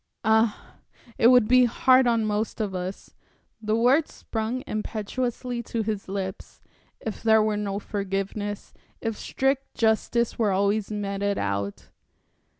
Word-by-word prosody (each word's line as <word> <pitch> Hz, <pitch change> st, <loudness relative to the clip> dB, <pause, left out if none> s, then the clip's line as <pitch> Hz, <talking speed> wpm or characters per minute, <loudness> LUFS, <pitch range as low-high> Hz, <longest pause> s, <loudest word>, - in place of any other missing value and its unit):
"Ah, 220 Hz, 0 st, +1 dB, 0.4 s
it 230 Hz, -, +6 dB
would 250 Hz, -3 st, +6 dB
be 255 Hz, +1 st, +6 dB
hard 255 Hz, +2 st, +4 dB
on 230 Hz, -2 st, +2 dB
most 215 Hz, +2 st, -2 dB
of 210 Hz, -3 st, -2 dB
us" 185 Hz, +1 st, -6 dB, 0.5 s
the 215 Hz, 0 st, 0 dB
words 255 Hz, +7 st, +3 dB
sprung 225 Hz, +3 st, -4 dB
impetuously 240 Hz, +3 st, -3 dB
to 230 Hz, -1 st, -3 dB
his 210 Hz, -2 st, -3 dB
lips 190 Hz, -1 st, -5 dB, 0.4 s
"if 220 Hz, -, -6 dB
there 220 Hz, -1 st, +5 dB
were 215 Hz, -1 st, 0 dB
no 200 Hz, -1 st, -2 dB
forgiveness, 200 Hz, 0 st, -4 dB, 0.3 s
if 225 Hz, -1 st, -3 dB
strict 270 Hz, +4 st, -1 dB
justice 230 Hz, +1 st, +1 dB
were 220 Hz, -3 st, +3 dB
always 200 Hz, +2 st, +1 dB
meted 200 Hz, -1 st, -2 dB
out." 100 Hz, 0 st, -3 dB
215 Hz, 135 wpm, -25 LUFS, 200-235 Hz, 0.5 s, it